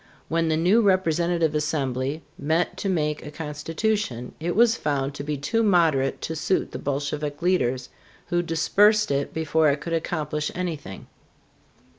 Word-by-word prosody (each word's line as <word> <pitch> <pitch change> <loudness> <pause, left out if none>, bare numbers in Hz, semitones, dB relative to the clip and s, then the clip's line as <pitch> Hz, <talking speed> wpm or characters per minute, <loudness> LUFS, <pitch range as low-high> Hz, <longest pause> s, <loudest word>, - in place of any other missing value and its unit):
When 165 0 +1
the 155 - +2
new 185 +8 +4
representative 170 -4 +2
assembly 145 -1 -1
met 160 +4 0
to 200 - -2
make 150 -4 -1
a - - -7
constitution, 150 - -3
it 170 +2 -2
was 230 +1 +5
found 140 -2 -1
to 140 - -6
be 150 0 -2
too 225 - 0
moderate 165 -10 +2
to 160 - -3
suit 165 +4 0
the - - -6
Bolshevik 145 +1 -3
leaders, 130 -9 +1 0.4
who 175 0 +2
dispersed 205 +5 +3
it 140 0 0
before 160 -1 +2
it 140 +1 0
could 165 +3 -5
accomplish 150 -2 -2
anything. 160 - -5
160 Hz, 150 wpm, -24 LUFS, 145-175 Hz, 0.4 s, was